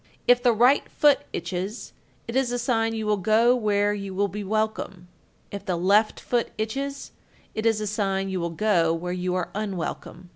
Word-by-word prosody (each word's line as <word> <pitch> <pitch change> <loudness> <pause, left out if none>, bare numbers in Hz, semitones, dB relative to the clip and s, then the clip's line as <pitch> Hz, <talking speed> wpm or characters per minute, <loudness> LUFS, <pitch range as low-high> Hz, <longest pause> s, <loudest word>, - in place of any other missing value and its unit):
If 245 0 +5
the 245 -1 +4
right 245 +5 +3
foot 290 -2 +3
itches, 185 +6 -5 0.3
it 230 - -5
is 260 -2 +1
a 245 - -1
sign 225 -2 0
you 220 -1 -3
will 210 0 +2
go 220 +5 +4
where 205 -3 +1
you 200 -2 -6
will 200 +1 +1
be 210 +1 -5
welcome; 205 -3 -2 0.4
if 200 - -6
the 180 - -1
left 200 +5 +2
foot 240 -1 -1
itches, 275 +6 -4 0.4
it 220 +1 -1
is 225 -2 +2
a 215 - -3
sign 195 -2 -1
you 190 -1 -2
will 170 0 -2
go 170 -2 +2
where 180 +2 -4
you 180 0 -2
are 180 -2 -2
unwelcome. 185 -3 -5
210 Hz, 190 wpm, -25 LUFS, 185-225 Hz, 0.4 s, If